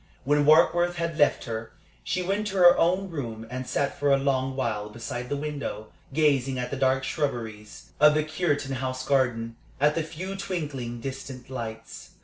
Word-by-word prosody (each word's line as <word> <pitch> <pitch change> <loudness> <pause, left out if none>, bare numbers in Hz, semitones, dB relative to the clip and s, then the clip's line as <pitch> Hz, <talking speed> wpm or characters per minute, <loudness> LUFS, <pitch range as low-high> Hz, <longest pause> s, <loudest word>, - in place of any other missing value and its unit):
When 145 +2 +2
Warkworth 175 +3 +5
had 170 -2 -3
left 145 - +3
her, 110 -1 -5 0.3
she 185 - -1
went 200 +3 -1
to 200 - -4
her 175 -1 +8
own 185 +3 +1
room 115 -8 -5
and 130 0 -4
sat 140 0 -1
for 145 0 +2
a 140 - +6
long 135 -1 0
while 105 -6 -2
beside 120 +2 -6
the 145 - -1
window, 140 -7 -4 0.2
gazing 135 -3 +2
at 125 0 -3
the - - -1
dark 135 0 +2
shrubberies 115 -9 -4
of 150 +1 +7
the 155 - +2
Cureton 150 -4 -1
House 130 0 -3
garden, 120 -4 +1 0.2
at 150 +2 +4
the 165 - 0
few 170 +5 -6
twinkling, 145 -11 -4
distant 135 0 -7
lights. 115 -3 -7
135 Hz, 175 wpm, -26 LUFS, 125-155 Hz, 0.3 s, her